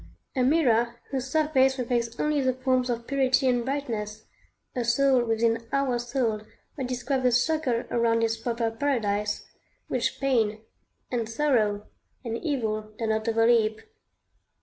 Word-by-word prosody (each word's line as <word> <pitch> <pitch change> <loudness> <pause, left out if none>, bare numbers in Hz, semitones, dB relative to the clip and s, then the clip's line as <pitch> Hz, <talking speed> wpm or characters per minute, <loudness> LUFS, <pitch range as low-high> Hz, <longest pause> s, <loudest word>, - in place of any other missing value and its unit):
] - - -48
a 260 - +1
mirror 240 -5 +2
whose 265 -1 -3
surface 270 -3 +3
reflects 235 -2 -2
only 300 -1 +1
the 260 -1 +1
forms 255 -1 +1
of 235 -1 -2
purity 265 0 +2
and 245 -1 +2
brightness; 230 -6 -4 0.5
a 245 - 0
soul 255 +1 +3
within 230 0 0
our 275 -3 +1
soul 240 -3 -1 0.3
that 265 -4 -3
describes 255 +1 -2
a 250 - +4
circle 250 -1 +1
around 230 -1 +2
its 225 0 +1
proper 230 0 -2
paradise, 210 -5 -1 0.4
which - - -1
pain, 225 -6 +1 0.5
and 230 -3 -1
sorrow, 225 -6 +1 0.4
and 230 -1 -2
evil 220 -8 -2
dare 225 -1 -2
not 220 +1 0
overleap. 225 -1 +3
240 Hz, 145 wpm, -26 LUFS, 225-265 Hz, 0.5 s, a